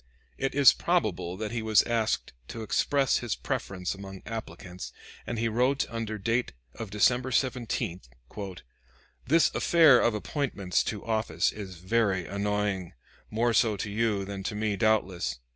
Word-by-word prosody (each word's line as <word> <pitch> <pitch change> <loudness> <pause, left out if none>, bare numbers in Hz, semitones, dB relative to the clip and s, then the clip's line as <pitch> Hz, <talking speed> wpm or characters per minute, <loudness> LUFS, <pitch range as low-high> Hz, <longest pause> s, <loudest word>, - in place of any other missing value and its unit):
It 135 0 -1
is 140 -2 +8
probable 95 - -1
that 110 0 -4
he 115 -1 -2
was 110 -1 +4
asked 115 -2 -1
to 115 - -6
express 135 +5 +2
his 120 -3 -2
preference 90 -2 -3
among 95 -1 -9
applicants, 90 -5 -7 0.4
and 120 - -3
he 115 +1 +1
wrote 125 +5 +1
under 115 -2 -3
date 115 +4 -1 0.2
of 110 -3 -7
December 120 +6 +2
17: 120 -7 -1 1.3
"This 165 +5 +4
affair 160 -7 +6
of 115 - +2
appointments 105 - -1
to 105 -3 -4
office 110 -7 0
is 100 -3 -8
very 95 0 0
annoying 100 -2 -2 0.4
more 115 +2 +1
so 110 -2 +3
to 100 +1 -4
you 105 -2 0
than 100 0 -6
to 105 +2 -4
me 105 -1 0
doubtless. 95 - +1
110 Hz, 145 wpm, -28 LUFS, 95-120 Hz, 1.3 s, is